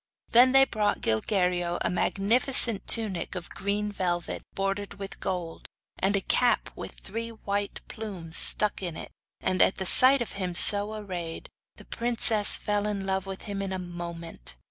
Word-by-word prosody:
Then 250 +2 +6
they 270 0 +6
brought 210 -4 -1
to - - -18 0.2
Gilguerillo 180 -3 -1
a 170 - -1
magnificent 225 +4 0
tunic 210 -6 +4
of 180 -1 -7
green 205 +1 -3
velvet 175 -3 -3
bordered 195 +1 -3
with 195 0 -9
gold, 175 -3 -5 0.3
and 195 +2 +1
a 200 - 0
cap 245 +5 +1
with - - -8
three 230 +3 -6
white 205 -2 -4
plumes 185 -7 -8
stuck 210 -1 +2
in 170 -3 -4
it; - - -8 0.3
and 185 -1 0
at - - +3
the 190 - -4
sight 255 +6 +6
of - - -10
him 185 -3 -5
so 205 +4 +6
arrayed, 180 -6 -6 0.3
the - - -15
princess 230 -3 +2
fell 205 0 -2
in 200 -2 -3
love 190 0 -2
with 195 -1 -7
him 200 -2 -5
in 195 -1 -4
a 190 - -3
moment. 170 - -8
195 Hz, 170 wpm, -26 LUFS, 180-215 Hz, 0.3 s, Then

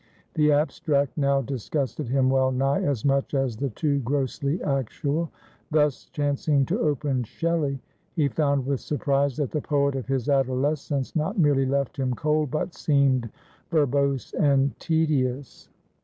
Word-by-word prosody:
The 150 -1 +3
abstract 145 -1 +1
now 140 -2 +2
disgusted 135 +1 -3
him 130 0 +2
well 130 -1 +3
nigh 135 +2 +1
as 140 -5 -1
much 140 +1 +1
as 135 -4 0
the 140 +5 -2
too 140 +4 0
grossly 140 +4 -1
actual. 140 +4 -1 0.4
Thus, 150 -3 +1
chancing 145 -1 0
to - - -1
open 145 -3 0
Shelley, 150 +1 -1 0.4
he 155 -5 +2
found 140 -1 0
with 140 -1 -1
surprise 140 -2 0
that 145 -5 -1
the 150 - -1
poet 140 -1 +1
of 130 - -4
his 135 -3 -1
adolescence 135 +1 0
not 160 +7 -1
merely 145 -5 +3
left 140 0 -1
him 130 -2 -1
cold, 150 0 0
but 160 +5 -2
seemed 135 -5 +2 0.4
verbose 140 -4 +1
and 140 -2 +2
tedious. 145 -5 -1
140 Hz, 145 wpm, -25 LUFS, 135-150 Hz, 0.4 s, The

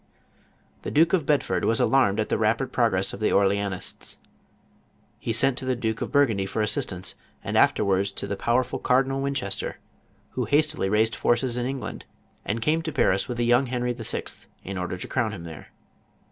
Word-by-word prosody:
The - - -4
Duke 165 +4 +3
of 165 -7 +2
Bedford 115 -12 +1
was 115 - +2
alarmed 120 -6 +3
at 110 - -1
the - - +1
rapid 115 +4 +1
pro 120 -2 +3
gress 95 0 -1
of - - -7
the 110 - +1
Orleanists; 100 -1 0 1.0
he - - -3
sent 130 +3 +1
to 130 - -6
the 130 0 +1
Duke 115 -2 -2
of - - -3
Bur 145 0 +5
gundy 100 -6 -2
for 110 - -1
assistance, 95 -3 -2 0.3
and - - -3
afterwards 100 -1 +3
to - - -4
the 100 - -3
powerful 120 +5 0
Cardinal 135 +1 +2
Winchester, 135 -8 -3 0.5
who - - -2
hastily 150 -7 +2
raised 110 +2 +2
forces 120 0 +1
in 125 0 -1
Eng 135 0 -3
land, - - -7 0.4
and 110 +2 -2
came 160 +4 +2
to 160 -1 -4
Paris 100 -8 +2
with 125 - -4
the 120 - +1
young 120 +3 +4
Henry 125 0 -1
VI. 115 -3 -2 0.4
in. 100 - -5
order 90 0 -3
to - - -7
crown 110 -2 -1
him 90 -5 -7
there. 80 -2 -9
115 Hz, 195 wpm, -25 LUFS, 100-135 Hz, 1.0 s, Bur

